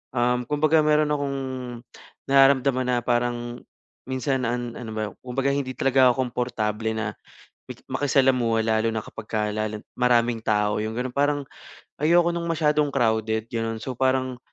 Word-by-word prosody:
um, 125 0 +1
kumbaga 155 +2 +3
meron 150 0 +3
akong 140 -2 -1 0.9
nararamdaman 135 -1 +4
na 125 -1 +2
parang 120 0 -1 0.5
minsan 130 0 -1
an 120 0 -3
ano 115 -3 -7
ba, 110 - -1 0.2
kumbaga 135 +2 -1
hindi 135 -2 -2
talaga 130 0 +4
ako 130 +2 0
komportable 110 -3 -2
na 110 -1 -2 0.6
maki - - -13
makisalamuha 130 -5 +2
lalo 110 0 +2
na 110 - -2
kapag 110 -1 -10
ka 110 - 0
lalo 110 0 -3 0.2
maraming 120 -2 +2
tao, 105 -1 +1
yung 110 - -3
gano'n. 125 0 -3
Parang 145 0 +1 0.6
ayoko 170 +2 +4
ng 170 - -2
masyadong 150 -3 +2
crowded, 110 -3 0
gano'n. 115 -1 -2
So, 130 - -4
parang 130 0 0
125 Hz, 150 wpm, -24 LUFS, 115-140 Hz, 0.9 s, nararamdaman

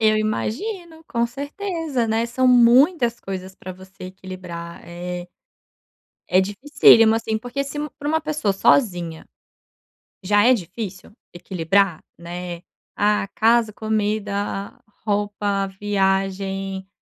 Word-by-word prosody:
Eu 215 -1 +4
imagino 320 - -3
com 235 0 0
certeza, 285 - -3
né, 225 +1 +1
são 255 +2 +1
muitas 245 +1 +5
coisas 190 -1 -6
pra 185 - -8
você 190 +1 -13
equilibrar 185 -2 -8
é 175 +1 -6 1.0
é 185 - +4
dificílimo, 220 +1 +5
assim, 220 -1 -1
porque 245 +4 -4
se 280 - -6
u 300 - -3
pra 290 - -4
uma 320 +1 +1
pessoa 300 -10 -1
sozinha, 175 - +1 1.0
já 205 +2 +3
é 255 +2 +6
difícil 190 0 -6 0.2
equilibrar, 175 0 0 0.2
né. 175 0 -7 0.3
Ah, 210 -1 +1
casa, 230 0 +3
comida, 210 -2 -2 0.3
roupa, 205 -1 0
viagem, 195 -1 -1
205 Hz, 115 wpm, -22 LUFS, 190-240 Hz, 1.0 s, é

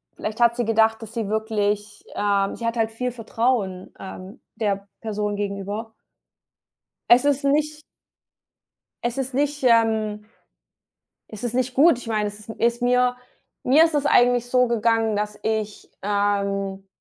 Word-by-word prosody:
vielleicht 215 +1 -5
hat 235 0 +4
sie 240 - -1
gedacht, 225 0 +2
dass 225 0 -9
die 225 -3 -2
wirklich, 210 -1 -1
ähm 200 -1 0
sie 235 - -6
hat 230 - -2
halt 225 -1 +1
viel 250 +2 -3
Vertrauen, 225 -5 -2
ähm, 190 +4 -9 0.2
der 200 -2 -1
Person 210 -2 -2
gegenüber. 205 +2 -4 1.2
Es 245 +3 +6
ist 285 -1 +1
nicht 300 +2 +1 1.2
es 240 +2 -2
ist 265 0 -3
nicht, 290 +1 0
ähm 220 -3 +2 1.0
es 215 +2 -8
ist 240 -1 -2
nicht 255 0 0
gut, 295 -1 +5
ich 245 - -10
meine, 215 -2 0
es 205 0 -9
ist 215 - -15
m 225 - -8
ist 235 +1 +1
mir 250 0 +2 0.5
mir 280 +5 +6
ist 330 -1 0
es 290 0 0
eigentlich 245 -2 +4
so 250 0 +3
gegangen, 225 -1 +1
dass 210 0 -3
ich, 215 -1 -3
ähm, 200 -1 -1
225 Hz, 155 wpm, -23 LUFS, 205-245 Hz, 1.2 s, Es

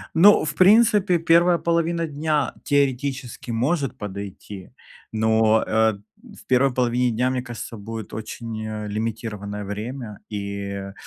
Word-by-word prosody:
Ну, 195 +3 +7
в 145 -1 -3
принципе, 205 -2 +5
первая 170 +2 +4
половина 170 0 0
дня 150 -1 -1
теоретически 135 -3 -1
может 135 +5 0
подойти, 100 -1 -8 0.4
но, 110 0 +3
э, - - -8 0.2
ат 110 - -3 0.3
м, - - -14
в - - -15
первой 130 +1 +3
половине 125 0 +1
дня, 125 +3 +1
мне 130 -1 -1
кажется, 120 -2 -7
будет 110 +1 -7
очень, 110 0 -6
э, 105 -1 -5
лимитированное 105 -1 -4
время. 105 +2 -6
И, 100 -1 -4
э, 100 0 -6
120 Hz, 140 wpm, -23 LUFS, 105-145 Hz, 0.4 s, Ну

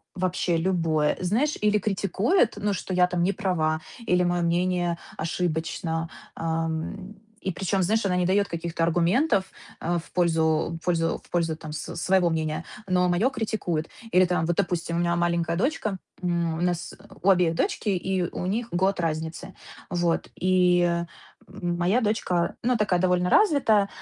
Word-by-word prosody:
Вообще 180 -1 0
любое. 165 -3 +1
Знаешь, 230 +12 +1
или 210 0 +3
критикует, 205 - +1
ну, 205 0 -1
что 185 0 -4
я 180 0 +5
там 180 -1 -1
не 190 +3 +2
права, 160 -6 0 0.3
или 180 0 +3
моё 175 0 +1
мнение 175 0 +1 0.2
ошибочно. 165 0 -2 0.3
Ам, 165 +4 -3 0.3
и 190 - -2
причём, 190 +2 0
знаешь, 220 +4 +1
она 180 -2 +1
не 180 - +1
даёт 200 +2 +2
каких-то 170 0 -3
аргументов, 180 - +2 0.4
э, 175 +1 0
в - - -18
пользу 165 -2 +1
в - - -16
пользу 165 -2 +1
в - - -22
пользу, 165 -2 0
там, 155 -2 -8
с - - -6
своего 185 0 +3
мнения, 155 -1 -2 0.2
но 180 -1 +2
моё 195 +9 +2
критикует. 210 - -2 0.2
Или, 185 +1 +6
там, 180 -2 0
вот, 175 - 0
допустим, 175 -3 -1
у - - 0
меня 170 0 +1
маленькая 170 -1 0
дочка, 215 - -1 0.3
м, 170 -2 0
у - - -3
нас, 175 -1 -1
э, - - -19 0.2
у 195 - +3
обеих 175 -3 +4
дочки, 210 - -1
и 185 -1 0
у 180 +1 -4
них 225 +5 -2
год 190 +2 +1
разницы. 160 0 -3 0.4
Вот. 175 -1 0
И, 175 -2 +3 0.4
моя 175 +7 0
дочка, 180 -5 0
ну, 250 +1 +2
такая 205 -5 +1
довольно 180 0 +2
развитая. 240 - +4
175 Hz, 165 wpm, -25 LUFS, 170-190 Hz, 0.4 s, Или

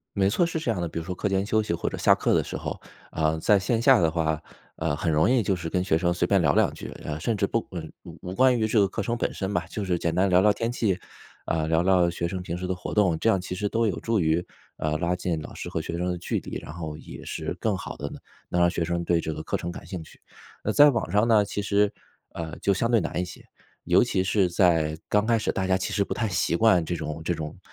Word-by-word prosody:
没 95 -1 +3
错， 115 - +2
是 165 -1 -2
这 155 -7 -1
样 100 -6 -1
的。 85 - -2
比 80 - -5
如 80 - -4
说 90 +1 -4
课 100 - -1
间 95 0 +1
休 110 +1 +2
息 105 - -3
或 - - -2
者 - - -5
下 - - +5
课 - - +1
的 - - +3
时 - - -6
候， - - -5 0.3
嗯， 80 0 +1
在 105 +4 +4
线 110 +4 0
下 130 -1 +6
的 80 -2 +3
话， 80 -2 -1 0.3
嗯， 80 -2 -1
很 80 +1 -1
容 80 +8 +3
易 125 -2 +3
就 100 -1 +1
是 85 -2 -5
跟 90 +2 0
学 85 -4 +2
生 85 0 +1
随 85 0 0
便 100 +1 +3
聊 75 -3 +3
两 - - +3
句。 - - -8 0.2
嗯， 75 0 -4
甚 115 +6 0
至 100 - +1
不 115 +3 -1
嗯， 80 -3 -6
无 - - -11
无 90 - -5
关 130 +2 +4
于 110 - +1
这 110 0 +3
个 100 - +4
课 95 - -3
程 120 +4 -1
本 - - -1
身 95 0 -3
吧， 85 -1 -1
就 105 - -4
是 90 -2 0
简 85 0 -1
单 95 +3 +3
聊 90 0 +5
聊 105 +2 +5
天 115 +3 -2
气， 105 -6 0 0.5
嗯， 80 -1 0
聊 80 +1 +3
聊 90 -1 +4
学 85 0 -3
生 90 +1 -4
平 85 -1 -4
时 90 +1 -4
的 95 - -1
活 90 - -6
动。 95 -6 +3
这 115 - +1
样 100 -4 +3
其 90 0 -5
实 105 +3 -1
都 115 +2 +1
有 95 -6 -2
助 115 -1 0
于， 80 0 +1 0.3
嗯， 75 0 -1
拉 85 +3 0
近 90 -3 -2
老 - - -9
师 - - -6
和 - - -3
学 85 - -4
生 90 - -1
的 90 -1 -2
距 90 - -2
离， - - -7
然 - - -9
后 80 -2 -6
也 - - -10
是 - - -4
更 - - +1
好 - - -7
地 70 - -4
能 - - -9 0.3
能 90 - 0
让 85 - +5
学 85 - -1
生 85 +1 -2
对 85 -1 +2
这 80 - -3
个 75 0 -5
课 - - -2
程 85 - -4
感 85 - -9
兴 90 -4 -6
趣。 - - -16 0.4
那 110 - +1
在 145 +5 +7
网 120 -9 -2
上 105 +3 +3
呢， 110 -3 +5
其 100 0 -4
实， 100 0 +2 0.4
呃， 80 -2 -6
就 100 - +2
相 115 +5 0
对 115 -2 +4
难 85 -1 -2
一 - - 0
些， 90 - -11 0.4
尤 - - +4
其 95 - 0
是 95 -1 +2
在 80 -4 +2
刚 105 0 +2
开 115 0 +3
始 110 - -1
大 95 - -1
家 95 0 +3
其 95 - -3
实 100 - +1
不 - - -5
太 110 -2 -1
习 90 -3 0
惯 90 -5 +4
这 85 - -2
种 80 0 -5
这 85 - 0
种 75 -2 -6
90 Hz, 315 characters per minute, -26 LUFS, 85-105 Hz, 0.5 s, 在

